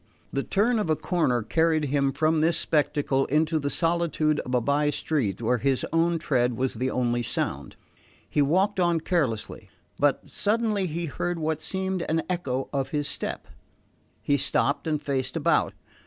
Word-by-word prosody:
The 140 - +1
turn 220 - +1
of 205 - -1
a 155 - +3
corner 145 -10 0
carried 160 +5 +2
him 140 -1 +1
from 155 +3 +1
this 165 +1 +2
spectacle 145 -4 +1
into 155 +2 +2
the 140 -1 -2
solitude 165 -2 +1
of 125 - -2
a - - +4
by 145 +4 +1
street 130 -8 -1
where 125 +2 +2
his 135 0 +1
own 165 +1 +2
tread 125 -6 0
was 130 0 0
the 125 +3 -1
only 120 -1 0
sound. 70 - -3 0.5
He 150 - +1
walked 190 +8 +2
on 175 -2 +2
carelessly; 140 - -2 0.3
but - - +1
suddenly 210 -2 0
he 170 +1 -3
heard 175 +3 -3
what 160 -1 -2
seemed 190 +1 -2
an 160 +1 +1
echo 135 -7 -2
of 135 -1 -1
his 145 -1 -1
step. - - -4 0.8
He 145 - +2
stopped 140 +2 0
and 155 -2 0
faced 130 -3 -2
about. - - +1
150 Hz, 170 wpm, -26 LUFS, 135-170 Hz, 0.8 s, a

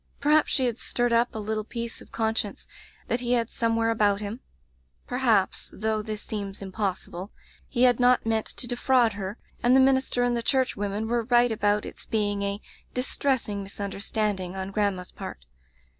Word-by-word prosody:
Perhaps 300 +1 +4
she 265 - +2
had 240 -2 -1
stirred 240 -1 0
up 235 +1 +4
a - - -2
little 215 0 -2
piece 235 +1 -5
of - - -15
conscience 220 -2 -1 0.4
that 240 - 0
he 245 0 0
had 235 -1 +1
somewhere 230 -1 +1
about 205 -3 +3
him; 210 +3 -5 0.7
perhaps 235 -6 +1
— - - -14
though 215 +1 0
this 215 0 -4
seems 200 -2 -4
im 195 -1 -7
possible 190 -1 -3 0.2
— - - -30
^he 240 - +2
had 245 -1 +5
not 250 -1 +4
meant 225 -1 +1
to - - -3
defraud 245 -1 +3
her, 200 +1 -5 0.2
and 245 +2 +5
the - - +7
minister 265 -2 +3
and 245 0 +2
the 235 - 0
church 260 +2 +1
women 205 +2 -2
were 235 0 0
right 240 0 +4
about 210 -1 +1
its - - -9
being 205 -2 0
a 200 0 -1 0.2
' - - -34
distressing 250 -5 -1
misunder 200 0 -5
standing' 200 -4 -1
on 190 0 -4
grandma's 200 -3 -1
part. 65 - -8
220 Hz, 190 wpm, -26 LUFS, 205-245 Hz, 0.7 s, the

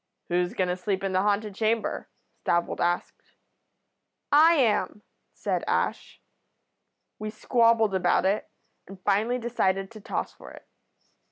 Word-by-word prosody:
"'Who's 175 0 0
going 185 - +1
to 180 - 0
sleep 190 +1 -2
in 195 - -1
the 185 - +3
haunted 205 +1 0
chamber?' 220 +2 -1 0.3
Stavold 170 0 0
asked. 175 0 -2 1.0
"'I 315 +3 +7
am,' 220 -7 +1 0.3
said - - -2
Ash. - - -1 1.0
"We 215 0 -4
squabbled 230 -1 +2
about 180 -1 +2
it, 195 +2 0 0.4
and 195 0 -11
finally 215 +6 +1
decided 195 -5 -1
to 215 -2 -11
toss - - -3
for - - -13
it. - - -15
205 Hz, 135 wpm, -26 LUFS, 190-230 Hz, 1.0 s, I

